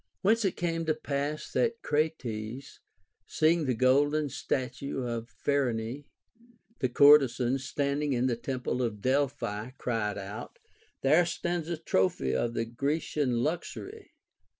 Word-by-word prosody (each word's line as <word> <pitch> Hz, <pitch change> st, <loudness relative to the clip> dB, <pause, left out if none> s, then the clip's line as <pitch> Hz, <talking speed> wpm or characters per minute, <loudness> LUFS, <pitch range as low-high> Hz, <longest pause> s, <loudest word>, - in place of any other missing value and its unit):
Whence 220 Hz, +4 st, +3 dB
it 195 Hz, -, 0 dB
came 165 Hz, -1 st, -1 dB
to 155 Hz, -, +2 dB
pass 145 Hz, 0 st, -3 dB
that 230 Hz, -1 st, 0 dB
Crates, 135 Hz, -5 st, -2 dB, 0.5 s
seeing 160 Hz, 0 st, +2 dB
the 130 Hz, -2 st, +1 dB
golden 145 Hz, +5 st, +3 dB
statue 135 Hz, +1 st, -3 dB
of 115 Hz, -1 st, -4 dB
Phryne 130 Hz, -1 st, -1 dB, 0.7 s
the 130 Hz, -, +1 dB
courtesan 135 Hz, -2 st, +5 dB
standing 140 Hz, +2 st, -1 dB
in 125 Hz, -1 st, +1 dB
the 125 Hz, -2 st, +1 dB
temple 125 Hz, +1 st, -3 dB
of 115 Hz, -4 st, -2 dB
Delphi, 125 Hz, -5 st, 0 dB
cried 110 Hz, -4 st, -1 dB
out. 100 Hz, +2 st, -7 dB, 0.4 s
There 155 Hz, +6 st, +4 dB
stands 170 Hz, -1 st, -2 dB
a 170 Hz, -, -2 dB
trophy 95 Hz, -, +1 dB
of 115 Hz, -, -1 dB
the 115 Hz, -, 0 dB
Grecian 135 Hz, 0 st, -1 dB
luxury. 390 Hz, -, -5 dB
135 Hz, 125 wpm, -29 LUFS, 120-155 Hz, 0.7 s, courtesan